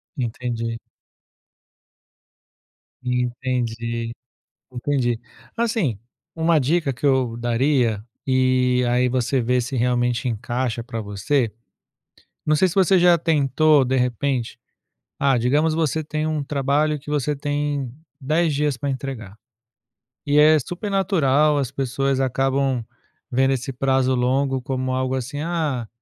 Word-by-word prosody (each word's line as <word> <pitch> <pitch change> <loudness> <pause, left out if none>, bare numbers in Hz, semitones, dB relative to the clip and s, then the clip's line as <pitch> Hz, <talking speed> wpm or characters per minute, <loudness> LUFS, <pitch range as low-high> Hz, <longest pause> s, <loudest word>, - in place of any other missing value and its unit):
Entendi. 115 -2 -3 2.3
Entendi. 120 -2 -2 0.6
Entendi. 125 -2 -1 0.4
Assim, 220 - 0 0.4
uma 165 0 +3
dica 145 +1 +1
que 125 +4 -3
eu 130 -4 +2
daria, 120 -2 +1 0.2
e 130 -1 +2
aí 125 +1 +2
você 130 +1 0
vê 125 +2 +1
se, 125 +2 -4
realmente, 120 0 +1
encaixa 120 +1 -2
pra 115 -3 -5
você. 105 +4 -1 0.9
Não 155 0 +3
sei 185 +5 +4
se 170 - -5
você 190 -1 +4
já 175 -1 +6
tentou, 150 -2 +3
de 130 +1 0
repente, 125 0 -1 0.6
ah, 135 -2 +3
digamos 145 +7 +2
você 160 -1 0
tem 155 +1 -3
um 155 -2 -1
trabalho 145 +2 0
que 145 - -11
você 150 0 0
tem 145 -2 -2 0.3
10 155 +3 +1
dias 145 -2 0
pra 140 0 -3
entregar. 130 -7 -5 0.9
E 145 0 +2
é 155 +1 +7
super 175 - -5
natural, 155 -7 +2
as 135 -3 -1
pessoas 135 0 -1
acabam 135 -1 0 0.5
vendo 135 +2 +3
esse 135 +1 -2
prazo 130 0 +1
longo 130 +1 +1
como 130 0 -2
algo, 130 0 -1
assim: 135 +3 -4
"Ah, 155 -9 -2
130 Hz, 125 wpm, -22 LUFS, 125-150 Hz, 2.3 s, é